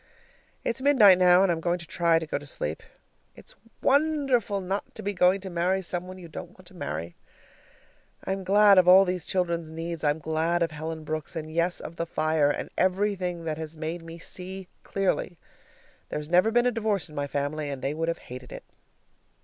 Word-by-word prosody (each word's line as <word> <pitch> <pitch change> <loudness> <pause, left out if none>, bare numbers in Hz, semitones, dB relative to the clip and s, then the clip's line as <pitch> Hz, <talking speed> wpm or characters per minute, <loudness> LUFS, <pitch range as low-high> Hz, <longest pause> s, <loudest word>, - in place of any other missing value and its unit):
It's 235 +3 -1
midnight 220 -10 +6
now, 180 +1 +6
and 190 - +3
I'm 165 -1 -2
going 175 +1 0
to 170 - -8
try 170 0 +2
to 165 - -2
go 155 - -3
to 145 - -12
sleep. 75 - -3 0.5
It's - - -12 0.3
wonderful 275 -7 +2
not 195 +2 -4
to - - -8
be 205 +1 -1
going 180 +1 +3
to 190 - -6
marry 180 +3 0
some 175 0 -3
one 185 0 -9
you 180 -2 -10
don't 160 - -9
want - - -17
to - - -19
marry. 80 +4 -5 1.1
I'm 190 0 -2
glad 200 0 +6
of 180 - +3
all 190 +2 +8
these 180 -2 -3
children's 170 -3 -1
needs, 165 0 -5
I'm 145 0 +2
glad 160 +2 0
of 165 - -2
Helen 160 +1 -6
Brooks, 155 0 -5
and, 155 -1 -5
yes, 170 +2 +1
of 165 - -9
the 170 - -2
fire, 155 -2 +1
and - - -3
everything 185 -2 0
that 160 -1 -3
has 160 0 -7
made 160 +2 -4
me 165 0 -10
see 185 +2 -7
clearly. 190 -3 -1 0.7
There's 150 0 -5
never 180 +5 +4
been 240 +2 +3
a 250 - +3
divorce 215 -5 -1
in 155 - -15
my 145 -1 -2
family, 145 +2 -2
and 135 -2 -6
they 140 - 0
would 165 +1 -2
have 165 0 -1 0.2
hated 125 -1 -9
it. - - -8
175 Hz, 205 wpm, -27 LUFS, 160-190 Hz, 1.1 s, all